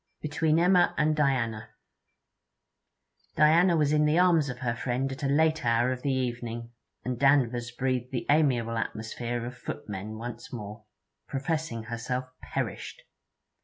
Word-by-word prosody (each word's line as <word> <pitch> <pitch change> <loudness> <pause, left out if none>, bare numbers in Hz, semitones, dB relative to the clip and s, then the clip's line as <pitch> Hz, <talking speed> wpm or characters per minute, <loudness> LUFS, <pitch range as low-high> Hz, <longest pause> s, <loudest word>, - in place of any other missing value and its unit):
BETWEEN 155 +1 +1
EMMA 175 +1 +4
AND 155 +1 +2
DIANA 120 -7 0 1.7
Diana 170 +3 +5
was 150 -2 +2
in 150 0 +4
the 150 +2 +3
arms 170 -5 +4
of 125 - -5
her 120 -2 -2
friend 130 +2 -2
at 135 - -7
a 140 - 0
late 155 +2 +2
hour 120 +1 +2
of 125 -1 -4
the 140 - 0
evening, 120 -2 -3 0.3
and 125 -1 -3
Danvers 125 -4 +3
breathed 125 0 -2
the 125 -2 -3
amiable 125 -7 +2
atmosphere 115 +2 -4
of 125 +1 -6
footmen 105 -3 -6
once 120 +1 -7
more, 105 -2 -8 0.4
professing 140 -4 -2
herself 120 +2 -3 0.2
perished. - - -5
125 Hz, 140 wpm, -28 LUFS, 120-150 Hz, 1.7 s, Diana